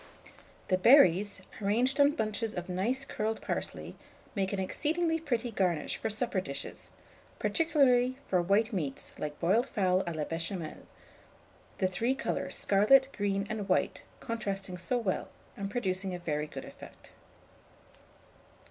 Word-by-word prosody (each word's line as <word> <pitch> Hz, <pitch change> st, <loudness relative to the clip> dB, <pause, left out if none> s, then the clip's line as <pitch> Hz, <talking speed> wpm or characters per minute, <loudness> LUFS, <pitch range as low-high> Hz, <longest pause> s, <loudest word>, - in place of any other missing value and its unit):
The 185 Hz, -1 st, +3 dB
berries, 205 Hz, -, +5 dB, 0.2 s
arranged 240 Hz, +7 st, +1 dB
on 285 Hz, +1 st, +6 dB
bunches 220 Hz, -4 st, -2 dB
of 180 Hz, -1 st, -4 dB
nice 225 Hz, +9 st, -1 dB
curled 220 Hz, -3 st, -2 dB
parsley, -, -, -4 dB, 0.4 s
make 195 Hz, -3 st, -1 dB
an 200 Hz, -, -2 dB
exceedingly 325 Hz, -, 0 dB
pretty 245 Hz, -6 st, -2 dB
garnish 180 Hz, -7 st, 0 dB
for -, -, -2 dB
supper 215 Hz, -2 st, -1 dB
dishes, 140 Hz, -5 st, -7 dB, 0.5 s
particularly 260 Hz, -6 st, +3 dB
for 180 Hz, -2 st, +2 dB
white 205 Hz, +6 st, +2 dB
meats, 150 Hz, -8 st, -3 dB
like 150 Hz, -1 st, -4 dB
boiled 215 Hz, +10 st, +2 dB
fowl 185 Hz, -2 st, +2 dB
à 170 Hz, -2 st, -3 dB
la 155 Hz, -, -1 dB
Béchamel, 165 Hz, +1 st, -4 dB, 0.9 s
the 185 Hz, -, +2 dB
three 230 Hz, +8 st, 0 dB
colours, -, -, -2 dB
scarlet, 255 Hz, +7 st, +5 dB
green, 200 Hz, -1 st, 0 dB
and 210 Hz, -2 st, -4 dB
white, 185 Hz, -, +1 dB, 0.2 s
contrasting 195 Hz, -5 st, -3 dB
so 245 Hz, +8 st, 0 dB
well, 210 Hz, -6 st, -1 dB, 0.3 s
and 200 Hz, 0 st, -4 dB
producing 190 Hz, -4 st, -1 dB
a -, -, -4 dB
very 150 Hz, -3 st, -2 dB
good -, -, -8 dB
effect. -, -, -13 dB
200 Hz, 140 wpm, -30 LUFS, 185-245 Hz, 0.9 s, on